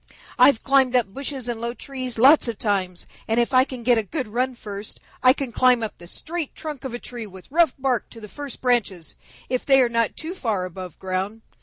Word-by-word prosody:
"I've 275 Hz, -6 st, +6 dB
climbed 270 Hz, -2 st, +3 dB
up 225 Hz, -6 st, +1 dB
bushes 275 Hz, -1 st, -5 dB
and 235 Hz, -2 st, -3 dB
low 235 Hz, +1 st, -3 dB
trees 255 Hz, -3 st, -5 dB
lots 270 Hz, +4 st, +6 dB
of 230 Hz, -3 st, -3 dB
times, 190 Hz, -5 st, -1 dB, 0.2 s
and 225 Hz, +1 st, +2 dB
if 240 Hz, +3 st, 0 dB
I 255 Hz, 0 st, +7 dB
can 255 Hz, -3 st, -8 dB
get 240 Hz, -1 st, +4 dB
a -, -, -1 dB
good 255 Hz, -, -4 dB
run 250 Hz, +4 st, -1 dB
first, 205 Hz, -2 st, -8 dB, 0.2 s
I 255 Hz, -, +7 dB
can 270 Hz, -2 st, -3 dB
climb 250 Hz, 0 st, +4 dB
up 220 Hz, -, -5 dB
the 175 Hz, -, -11 dB
straight 320 Hz, -, -4 dB
trunk 300 Hz, -5 st, -7 dB
of 260 Hz, -3 st, -4 dB
a -, -, -2 dB
tree 240 Hz, -2 st, -7 dB
with 190 Hz, +4 st, -14 dB
rough 330 Hz, -3 st, +3 dB
bark 260 Hz, -5 st, -1 dB
to 230 Hz, -, -12 dB
the 215 Hz, -, -9 dB
first 285 Hz, +3 st, -8 dB
branches 220 Hz, -9 st, 0 dB, 0.3 s
if 255 Hz, -1 st, -1 dB
they 270 Hz, -1 st, +5 dB
are 250 Hz, -2 st, +4 dB
not 230 Hz, -2 st, 0 dB
too 320 Hz, +3 st, -5 dB
far 220 Hz, -, -1 dB
above 185 Hz, -1 st, -8 dB
ground. 190 Hz, +4 st, -3 dB
240 Hz, 225 wpm, -23 LUFS, 210-265 Hz, 0.3 s, I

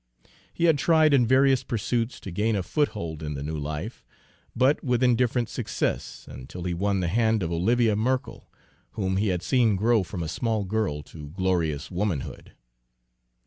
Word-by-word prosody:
He 170 Hz, -, -4 dB
had 165 Hz, -4 st, +4 dB
tried 155 Hz, 0 st, +4 dB
in 125 Hz, -4 st, +4 dB
various 135 Hz, +1 st, +4 dB
pursuits 115 Hz, +1 st, -2 dB
to 95 Hz, -, -7 dB
gain 105 Hz, +5 st, 0 dB
a 95 Hz, -, -1 dB
foothold 90 Hz, -, -2 dB
in 75 Hz, -1 st, -4 dB
the 70 Hz, -, -5 dB
new 80 Hz, +2 st, -4 dB
life, 75 Hz, -, -5 dB, 0.5 s
but 130 Hz, +4 st, +2 dB
with 125 Hz, -2 st, +1 dB
indifferent 125 Hz, -1 st, +2 dB
success -, -, -3 dB
until 85 Hz, +8 st, -9 dB
he 90 Hz, 0 st, -2 dB
won 100 Hz, +2 st, 0 dB
the 90 Hz, -, 0 dB
hand 110 Hz, +1 st, +2 dB
of 85 Hz, -, -2 dB
Olivia 110 Hz, +6 st, +2 dB
Merkell, 125 Hz, +5 st, -2 dB, 0.4 s
whom 95 Hz, -2 st, -1 dB
he 105 Hz, +2 st, +1 dB
had 90 Hz, -2 st, -1 dB
seen 120 Hz, -3 st, +3 dB
grow 110 Hz, +3 st, +3 dB
from 90 Hz, -1 st, -5 dB
a -, -, -3 dB
small 110 Hz, +4 st, -1 dB
girl 95 Hz, -7 st, -2 dB
to 75 Hz, -2 st, -11 dB
glorious 85 Hz, -4 st, -1 dB
womanhood. 90 Hz, -6 st, -3 dB
105 Hz, 170 wpm, -26 LUFS, 85-120 Hz, 0.5 s, had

